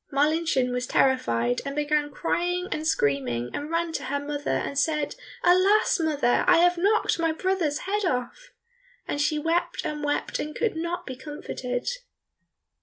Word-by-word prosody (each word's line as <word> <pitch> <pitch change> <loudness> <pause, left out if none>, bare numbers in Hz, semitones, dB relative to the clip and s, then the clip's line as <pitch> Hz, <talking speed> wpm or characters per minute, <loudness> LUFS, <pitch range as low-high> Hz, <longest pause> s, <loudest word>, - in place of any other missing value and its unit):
Marlinchen 290 -2 +2
was 250 0 -2
terrified, 120 - +2
and 275 0 -5
began 295 0 +1
crying 355 +4 -1
and 310 +1 -2
screaming, 130 - 0
and 290 +1 -4
ran 335 0 -1
to - - -3
her 285 +2 -1
mother, 290 0 -4
and 280 - -1
said, 300 0 0 0.3
"Alas, 370 +4 +4
mother, 295 -7 +2
I - - +7
have 350 +1 +5
knocked 400 +1 +2
my 330 -1 +2
brother's 330 -3 -1
head 410 +2 -1
off!" 355 - -2 0.6
and 290 - -1
she 305 +1 +1
wept 325 +3 -1
and 300 -1 -3
wept 290 0 -1
and 300 0 -4
could 455 -6 0
not 340 +2 -3
be 260 - -6
comforted. 255 -2 -5
300 Hz, 160 wpm, -26 LUFS, 270-340 Hz, 0.6 s, I